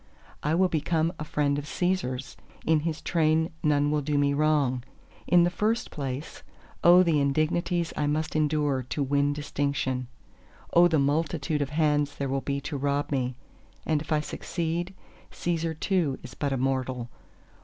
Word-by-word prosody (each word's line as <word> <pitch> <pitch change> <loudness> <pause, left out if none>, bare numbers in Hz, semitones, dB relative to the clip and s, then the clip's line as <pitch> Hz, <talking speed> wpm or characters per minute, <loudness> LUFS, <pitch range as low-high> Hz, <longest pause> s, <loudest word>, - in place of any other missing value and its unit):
I 150 +2 +1
will 185 +2 +4
become 165 0 0
a - - -3
friend 145 -1 0
of 145 - -7
Cæsar's! 150 -7 -2 0.3
in 160 -1 +4
his 160 0 -3
train 160 -1 +2
none 145 -1 +2
will 150 0 +1
do 145 +1 -1
me 140 0 +3
wrong! 140 -4 +2 0.4
In 175 -1 +6
the 175 - +2
first 220 +5 0
place—O 150 +5 +1
the 160 -4 +2
indignities 160 +4 0
I 150 - 0
must 155 +2 -1
endure 150 -3 +1
to 145 - -1
win 140 +1 +2
distinction! 140 -3 -2 0.7
O 175 +1 +7
the 165 -2 +2
multitude 150 +1 0
of 140 - -1
hands 150 -1 +1
there 140 -1 -3
will 135 0 0
be 140 0 -2
to 145 - -4
rob 140 +1 -1
me! 130 -2 -1 0.5
And 155 -2 +1
if 155 - -9
I 155 -1 +3
succeed, 170 +3 -3 0.4
Cæsar 165 -2 -2
too 170 -9 +1
is 125 -1 -9
but 145 -2 -2
a 135 - 0
mortal. 130 -2 -1
150 Hz, 165 wpm, -27 LUFS, 140-160 Hz, 0.7 s, O